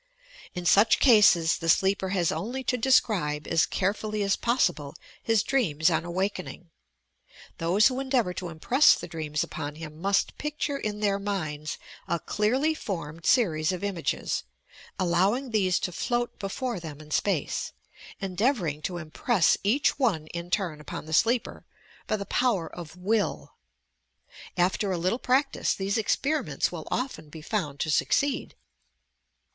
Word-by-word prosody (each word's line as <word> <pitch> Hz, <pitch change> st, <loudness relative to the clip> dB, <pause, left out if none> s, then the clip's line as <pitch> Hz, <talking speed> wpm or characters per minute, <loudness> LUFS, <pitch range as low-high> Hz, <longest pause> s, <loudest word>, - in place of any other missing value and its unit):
In 180 Hz, -1 st, -5 dB
such 205 Hz, +6 st, +5 dB
cases 200 Hz, -9 st, +5 dB
the 165 Hz, -, -2 dB
sleeper 190 Hz, +2 st, +2 dB
has 180 Hz, -3 st, +1 dB
only 255 Hz, +5 st, -4 dB
to 250 Hz, -, 0 dB
deseribe 210 Hz, -, +2 dB
as 165 Hz, -1 st, +2 dB
care 195 Hz, +1 st, 0 dB
fully 215 Hz, -1 st, -3 dB
as 195 Hz, 0 st, +2 dB
possible 175 Hz, -, 0 dB, 0.3 s
his 225 Hz, -2 st, +2 dB
dreams 170 Hz, -, +1 dB
on 165 Hz, 0 st, 0 dB
awakening. 180 Hz, -1 st, -4 dB, 0.9 s
Those 180 Hz, +6 st, +3 dB
who 260 Hz, 0 st, +3 dB
endeavour 260 Hz, -8 st, 0 dB
to 180 Hz, -1 st, -5 dB
impress 240 Hz, -, +4 dB
the -, -, -7 dB
dreams 150 Hz, -2 st, -2 dB
upon 145 Hz, +1 st, -6 dB
him 155 Hz, 0 st, -9 dB
must 200 Hz, +1 st, +1 dB
picture 300 Hz, -1 st, -2 dB
in 210 Hz, 0 st, -4 dB
their 200 Hz, -1 st, +1 dB
minds 155 Hz, -7 st, -3 dB, 0.3 s
a 170 Hz, 0 st, 0 dB
clearly 255 Hz, -, +1 dB
formed 165 Hz, -, -5 dB
series 160 Hz, -11 st, +3 dB
ot 185 Hz, +1 st, -5 dB
images 190 Hz, -5 st, -2 dB, 0.3 s
— -, -, -21 dB
al 185 Hz, -, +1 dB
lowing 205 Hz, +9 st, +1 dB
these 190 Hz, -5 st, +2 dB
to 180 Hz, -, -2 dB
float 240 Hz, +6 st, -2 dB
before 220 Hz, +2 st, -3 dB
them 155 Hz, -4 st, -8 dB
in 150 Hz, 0 st, -13 dB
space, 180 Hz, -3 st, -1 dB, 0.5 s
endeavouring 190 Hz, -, 0 dB
to 175 Hz, +2 st, -3 dB
impress 175 Hz, +4 st, +2 dB
each 270 Hz, +8 st, +2 dB
one 195 Hz, -, +1 dB
in 170 Hz, 0 st, -5 dB
turn 175 Hz, -6 st, -1 dB
upon 150 Hz, -, -7 dB
the 160 Hz, -, -7 dB
sleeper 230 Hz, +8 st, +1 dB, 0.4 s
by -, -, +1 dB
the 200 Hz, -1 st, -4 dB
power 220 Hz, -10 st, +1 dB
of 170 Hz, -2 st, -9 dB
will. 205 Hz, +3 st, -1 dB, 1.0 s
After 190 Hz, +3 st, +1 dB
a 180 Hz, -, 0 dB
little 185 Hz, +8 st, 0 dB
practice 270 Hz, +3 st, +1 dB
these 195 Hz, +1 st, -2 dB
experimenta 280 Hz, +7 st, 0 dB
will -, -, -7 dB
often 205 Hz, -, -3 dB
be 155 Hz, 0 st, -10 dB
found 155 Hz, -9 st, -3 dB
to 155 Hz, -, 0 dB
succeed. 280 Hz, -, +1 dB
195 Hz, 150 wpm, -27 LUFS, 165-230 Hz, 1.0 s, such